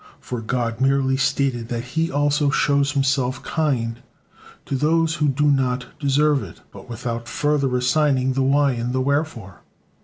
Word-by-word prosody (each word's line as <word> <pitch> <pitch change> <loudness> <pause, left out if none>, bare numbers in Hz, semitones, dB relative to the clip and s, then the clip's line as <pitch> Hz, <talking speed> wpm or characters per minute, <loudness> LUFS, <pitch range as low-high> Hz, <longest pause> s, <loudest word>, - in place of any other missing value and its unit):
For 125 -2 -5
God 115 0 -2
merely 135 0 +2
stated 130 -3 0
that 120 -1 -3
He 160 +6 -2
also 145 0 +1
shows 140 0 +1
Himself 135 -2 0
kind 125 -8 -1 0.7
to 135 - -3
those 160 +3 +1
who 150 - +1
do 145 +2 +2
not 125 -2 0
deserve 145 0 +2
it, - - -10
but - - -13
without 115 0 -5
further 145 -4 0
assigning 130 0 +2
the 135 - 0
why 140 +1 +3
and 120 0 -3
the 130 - 0
wherefore. 135 - -2
135 Hz, 155 wpm, -22 LUFS, 125-145 Hz, 0.7 s, why